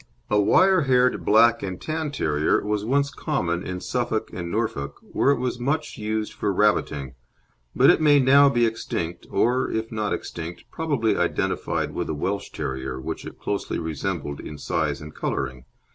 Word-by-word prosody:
A 105 -1 +4
wire 185 - +5
haired 125 -1 +3
black 115 +2 +5
and 95 -2 -4
tan 155 -1 -3
terrier 80 - +1
was 105 -1 -1
once 140 +5 +1
common 90 - -1
in 90 -1 -5
Suffolk 90 - -2
and 85 -1 -5
Norfolk, 95 -9 -2
where - - 0
it 140 - +4
was 125 0 -2
much 145 +4 -1
used 110 0 -2
for - - -1
rabbiting, 80 -10 +1 0.6
but - - +7
it - - +1
may 145 -2 +6
now 140 +2 +6
be 120 -3 +3
extinct, 90 -6 -3
or, 125 +2 +1
if 110 0 -3
not 110 -2 -2
extinct, 85 +1 -5
probably 145 -9 0
identified - - -1
with - - -3
the 80 - -2
Welsh 95 +7 -2
Terrier, 65 -1 -4
which 65 - -5
it - - -10
closely 100 - -3
resembled 80 -2 -3
in 75 - -8
size 75 - -1
and 75 0 -9
colouring. 65 -1 -3
105 Hz, 170 wpm, -24 LUFS, 85-130 Hz, 0.6 s, but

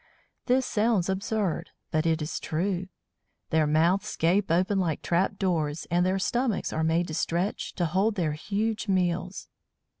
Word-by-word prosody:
This 255 0 +3
sounds 210 -4 +1
absurd, 195 -1 -1 0.2
but 155 +1 +1
it 160 -1 +1
is 150 - -3
true. 180 +3 -2 0.6
Their 160 -2 +3
mouths 175 +7 +2
gape 185 +5 +2
open 185 +4 +2
like 165 -5 -1
trap 185 +3 +1
doors, 165 -6 -1
and 175 +1 +3
their 185 +1 +1
stomachs 240 +3 0
are 160 - 0
made 165 +2 +2
to - - -4
stretch, 170 +5 -1
to 175 - 0
hold 195 +6 +1
their 170 -6 0
huge 210 +7 -2
meals! 180 -1 -1
180 Hz, 155 wpm, -27 LUFS, 165-200 Hz, 0.6 s, This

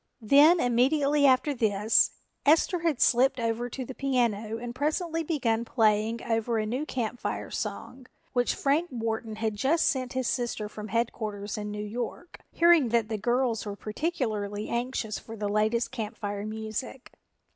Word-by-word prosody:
Then 295 +9 +6
immediately 280 +3 +3
after 265 +3 +3
this, 220 -3 +3 0.3
Esther 325 +4 +3
had 330 -6 0
slipped 255 +2 +4
over 230 +1 -1
to 260 +2 -5
the 260 - -7
piano 235 -5 0
and 240 +1 -6
presently 320 +5 -1
begun 240 -8 0
playing 225 -1 +1
over 225 0 0
a 215 - 0
new 255 +8 -3
Camp 245 -1 -3
Fire - - -4
song, 255 0 -5 0.3
which 245 -1 +1
Frank 300 +5 +1
Wharton 225 -2 -3
had 220 -1 -2
just 280 +10 +2
sent 255 -2 0
his 260 -2 -1
sister 235 -3 -2
from 210 0 -8
headquarters 215 -2 -2
in 210 -1 -4
New 210 0 -4
York, 240 +10 -6
hearing 335 -7 +5
that 230 -1 +1
the 220 - -2
girls 240 +1 0
were 205 -1 -5
particularly 215 -4 -3
anxious 235 -3 -2
for 225 - -10
the 210 -1 -3
latest 215 +3 +1
Camp 225 -3 -5
Fire 205 0 -4
music. 220 +4 -6
235 Hz, 160 wpm, -28 LUFS, 215-265 Hz, 0.3 s, Then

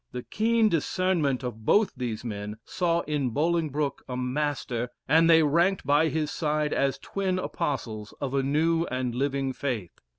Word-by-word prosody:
The 125 -1 -4
keen 225 +1 +2
discernment 165 -6 +1
of 115 -3 -5
both 205 - +3
these 120 -3 -4
men 105 -1 -5
saw 170 -2 0
in 145 -5 -1
Bolingbroke 150 0 0
a 125 - -3
master, 125 -2 -2 0.2
and 165 +3 +5
they 160 -1 +7
ranked 170 +5 +2
by 145 +3 +4
his 155 -2 -1
side 150 -1 0
as 135 -1 +1
twin 190 -2 -2
apostles 130 - -3
of 135 -2 -3
a 135 - +2
new 160 +5 +2
and 130 -3 -2
living 135 +1 -1
faith. 120 -11 -4
145 Hz, 160 wpm, -27 LUFS, 125-165 Hz, 0.2 s, they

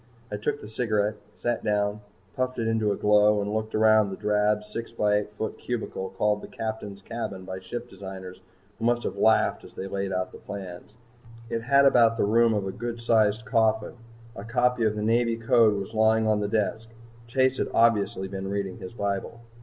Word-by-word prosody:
I 105 - -2
took 145 +8 -2
the - - -9
cigarette, 110 -2 0 0.2
sat 120 -1 -2
down, 105 0 0 0.3
puffed 130 0 -1
it 115 - -1
into 110 -2 +1
a - - 0
glow, 105 +1 +4
and 105 +1 -2
looked 110 0 -2
around 110 -1 +5
the 95 - -5
drab 105 +1 +1
6 110 +2 -7
x 115 - -23
8 105 0 +2
foot 110 +1 -5
cubicle 110 -5 -4
called 105 0 +1
the - - -8
Captain's 105 -3 -6
cabin 100 -5 -5
by 95 0 -6
ship 120 +6 -6
designers 95 -2 -9 0.4
who 115 - -2
must 120 0 +2
have - - -3
laughed 110 0 +3
as - - -14
they 95 - -5
laid 95 0 -3
out 95 0 -2
the - - -12
plans. 100 +1 -8 0.6
It 115 -1 -1
had 140 +4 +4
about 115 -4 +5
the - - +2
room 115 +1 +4
of 100 -2 -1
a 95 - -3
good 120 +3 -5
sized 110 -2 +2
coffin. 110 -1 +1 0.4
A 100 - -7
copy 125 +1 +1
of 105 -1 +1
the 105 - -3
Navy 115 +1 +2
Code 115 -2 +4
was 100 +3 -7
lying 110 0 +3
on 110 -1 +2
the 105 - -1
desk. 110 +1 -1 0.4
Chase 130 +2 +1
had - - 0
obviously 105 -4 +2
been 95 0 -5
reading 100 -2 -3
his 90 - -8
bible. 100 +2 -3
110 Hz, 200 wpm, -26 LUFS, 100-115 Hz, 0.6 s, around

